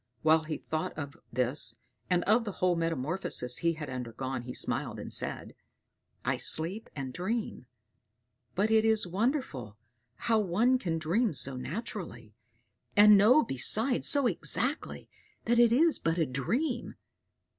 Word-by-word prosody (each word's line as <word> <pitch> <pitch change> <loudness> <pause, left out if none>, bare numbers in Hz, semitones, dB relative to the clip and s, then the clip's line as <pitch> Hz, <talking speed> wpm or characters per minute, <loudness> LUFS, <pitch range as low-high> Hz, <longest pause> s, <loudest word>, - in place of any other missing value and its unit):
While 160 0 +4
he 155 -1 -3
thought 155 0 -4
of 145 -2 -6 0.2
this 125 -1 -1 0.3
and 180 -1 +2
of 220 +3 +3
the 205 -3 -5
whole 180 -1 +1
metamorphosis 165 -5 -2
he 170 0 +1
had 155 -2 -7
undergone, 130 0 -5
he 125 +1 -7
smiled - - -2
and - - -6
said, - - -3 0.7
"I - - +1
sleep 180 +8 -1
and 135 -3 -5
dream; 190 - -3 0.9
but 205 +4 +1
it 220 0 +5
is 220 -2 +3
wonderful 180 - -2 0.4
how 225 -2 +1
one 220 +7 +2
can 165 -7 -2
dream 170 - 0
so 135 0 +1
naturally, 145 - -6 0.6
and 210 0 +9
know 220 +9 +6
besides 225 - +1
so 285 -2 +3
exactly 240 - -1 0.4
that 235 +1 +3
it 240 -1 +6
is 315 +6 +4
but 165 +1 0
a 165 - +2
dream. 230 - -2
175 Hz, 145 wpm, -30 LUFS, 140-225 Hz, 0.9 s, and